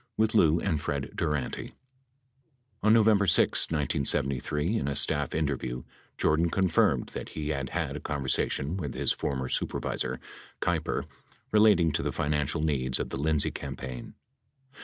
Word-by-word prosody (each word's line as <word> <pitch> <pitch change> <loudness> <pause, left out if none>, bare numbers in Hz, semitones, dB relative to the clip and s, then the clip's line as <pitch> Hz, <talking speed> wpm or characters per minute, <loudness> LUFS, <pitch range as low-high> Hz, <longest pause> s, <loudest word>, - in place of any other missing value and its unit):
with 110 0 +2
Lou 85 -6 +4
and 80 -6 -1
Fred 70 -2 -3
Durante. 75 -4 -2 1.1
On 110 - +4
November 110 -3 +4
6, 80 - +4
1973, 75 - 0
in 70 - -3
a 70 - -2
staff 75 -1 +2
interview, 65 -5 -2 0.3
Jordan 80 +2 +2
confirmed 95 -2 +2
that - - -7
he 75 -1 -5
had 70 -4 -2
had 80 -5 -3
a - - -4
conversation 70 +2 -1
with 75 -8 -5
his - - +1
former 65 -2 -2
supervisor, 65 0 -2 0.4
Keiper, - - -1 0.5
relating 105 -6 +5
to - - -1
the - - -2
financial 75 +1 -1
needs 65 -5 +1
of - - -3
the - - -3
Lindsay 75 0 +2
campaign. 65 -2 -7
75 Hz, 140 wpm, -28 LUFS, 70-85 Hz, 1.1 s, relating